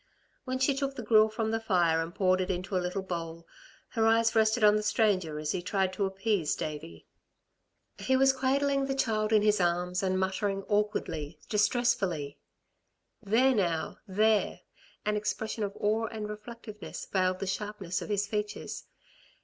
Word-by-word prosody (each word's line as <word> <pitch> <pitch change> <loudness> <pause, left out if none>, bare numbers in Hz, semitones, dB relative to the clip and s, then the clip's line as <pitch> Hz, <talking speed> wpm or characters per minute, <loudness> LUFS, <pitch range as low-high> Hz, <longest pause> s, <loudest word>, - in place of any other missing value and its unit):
When 255 0 -2
she 260 +2 +2
took 275 0 -2
the 245 - -6
gruel 215 0 +5
from 220 0 -2
the 225 - 0
fire 175 -7 +2
and 165 +2 -6
poured 185 -1 +2
it 185 - -3
into 185 +1 -3
a 185 - +2
little 180 +2 -3
bowl, 170 -2 -5 0.4
her 225 -1 +1
eyes 225 0 +3
rested 220 +1 +3
on 210 0 +7
the 215 - +1
stranger 200 -7 +1
as 150 0 -2
he 180 - -2
tried 190 +1 0
to 195 +1 0
appease 195 -4 0
Davey. 115 - -6 0.9
He 260 0 +2
was 270 0 +5
cradling 275 +1 +1
the 270 - -1
child 215 -5 0
in 215 -1 +4
his 210 -2 +3
arms, 180 +1 0
and 185 -1 0
muttering 195 +1 -1
awkwardly, 185 -7 -1
distressfully: 205 - +1 0.8
"There 230 +5 +3
now! 170 -7 -1
There!" 215 +2 +2 0.4
An 210 0 +1
expression 215 +1 -2
of 200 0 -4
awe 220 +2 +1
and 215 -1 -5
reflectiveness 210 0 -8
veiled 185 -1 0
the 195 - -4
sharpness 190 -2 -3
of - - -7
his 205 -1 +1
features. 210 0 -4
210 Hz, 165 wpm, -29 LUFS, 185-220 Hz, 0.9 s, on